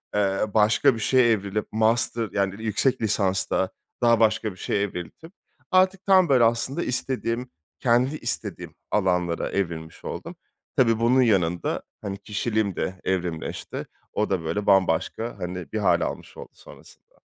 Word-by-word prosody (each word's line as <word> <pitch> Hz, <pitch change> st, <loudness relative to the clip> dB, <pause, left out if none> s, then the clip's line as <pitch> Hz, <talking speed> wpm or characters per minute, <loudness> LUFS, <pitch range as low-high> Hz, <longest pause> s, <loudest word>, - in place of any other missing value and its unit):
eee, 95 Hz, -1 st, +1 dB, 0.2 s
başka 110 Hz, +3 st, +4 dB
bir 115 Hz, -, -6 dB
şeye 125 Hz, +1 st, +4 dB
evrilip 105 Hz, 0 st, -1 dB
master, 115 Hz, 0 st, +1 dB
yani, 100 Hz, +1 st, -1 dB
yüksek 110 Hz, +4 st, +1 dB
lisansta 95 Hz, -3 st, +1 dB, 0.3 s
daha 115 Hz, -2 st, +4 dB
başka 110 Hz, -1 st, +2 dB
bir 90 Hz, -, -14 dB
şeye 100 Hz, +3 st, -1 dB
evrildim. 100 Hz, -, -6 dB, 0.4 s
Artık 185 Hz, +1 st, +3 dB
tam, 185 Hz, -4 st, +5 dB
böyle, 125 Hz, -3 st, +5 dB
aslında 120 Hz, +8 st, +1 dB
istediğim, 125 Hz, -1 st, -2 dB, 0.3 s
kendi 125 Hz, +4 st, +2 dB
istediğim -, -, -4 dB, 0.2 s
alanlara 90 Hz, -4 st, +1 dB
evrilmiş 85 Hz, -4 st, -4 dB
oldum. -, -, -6 dB, 0.4 s
Tabii, 115 Hz, -3 st, +3 dB
bunun 125 Hz, +3 st, +4 dB
yanında, 90 Hz, -8 st, +1 dB, 0.2 s
hani, 100 Hz, 0 st, -4 dB
kişiliğim 105 Hz, -1 st, -1 dB
de 95 Hz, 0 st, -3 dB
evrimleşti. 90 Hz, -3 st, -3 dB, 0.3 s
O 105 Hz, -, 0 dB
da, 95 Hz, -4 st, -1 dB
böyle, 90 Hz, +6 st, -2 dB
bambaşka, 95 Hz, +4 st, +2 dB
hani, 90 Hz, -1 st, -5 dB
bir 110 Hz, -, -2 dB
hâl 90 Hz, -4 st, +3 dB
almış -, -, -5 dB
oldu -, -, -9 dB
sonrasında. -, -, -17 dB
105 Hz, 140 wpm, -25 LUFS, 95-120 Hz, 0.4 s, tam